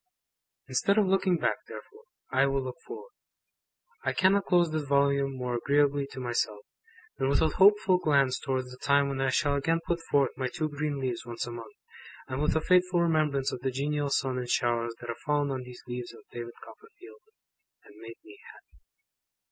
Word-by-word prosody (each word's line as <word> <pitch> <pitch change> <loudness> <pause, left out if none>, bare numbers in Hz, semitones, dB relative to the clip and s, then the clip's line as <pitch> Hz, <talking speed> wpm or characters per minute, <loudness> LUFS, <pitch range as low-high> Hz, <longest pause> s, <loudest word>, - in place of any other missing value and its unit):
Instead 200 +1 +1
of 215 - +5
looking 190 -1 +2
back, - - 0
therefore, 440 +2 -12 0.3
I 135 +1 +3
will 135 0 0
look 130 -1 -6
forward. 445 +3 -9 0.9
I - - 0
cannot 195 +1 +3
close 175 -3 +3
this 155 0 -1
Volume 140 -1 +1
more 125 -1 -3
agreeably 140 +2 +1
to 130 - -9
myself, 120 -4 -2 0.6
than 135 - +1
with 140 - +3
a 160 - +3
hopeful 190 +1 +5
glance 140 -5 +2
towards 130 -2 -3
the 125 - -12
time 140 0 +3
when 135 -1 -3
I 135 - +2
shall 145 +2 +1
again 165 +4 +1
put 170 0 -1
forth 140 -2 +3
my 130 0 -2
two 155 +5 -3
green 145 -1 -3
leaves 125 -3 -3
once 120 +1 -5
a 120 - -7
month, 115 -1 -9 0.5
and 130 +1 -4
with 150 - +1
a 160 - +2
faithful 180 +1 +3
remembrance 150 -5 +1
of - - -5
the 135 - 0
genial 145 +2 -1
sun 130 -2 0
and 125 -1 -5
showers 120 -1 0
that 120 - -8
have 115 - -4
fallen 145 -1 0
on 130 -1 -3
these 125 -1 -11
leaves 120 -1 -5
of - - -16
David 120 0 -7
Copperfield, 435 0 -15 0.6
and - - -18
made 115 +1 -10
me 390 +3 -14
happy. - - -22
140 Hz, 195 wpm, -28 LUFS, 125-165 Hz, 0.9 s, of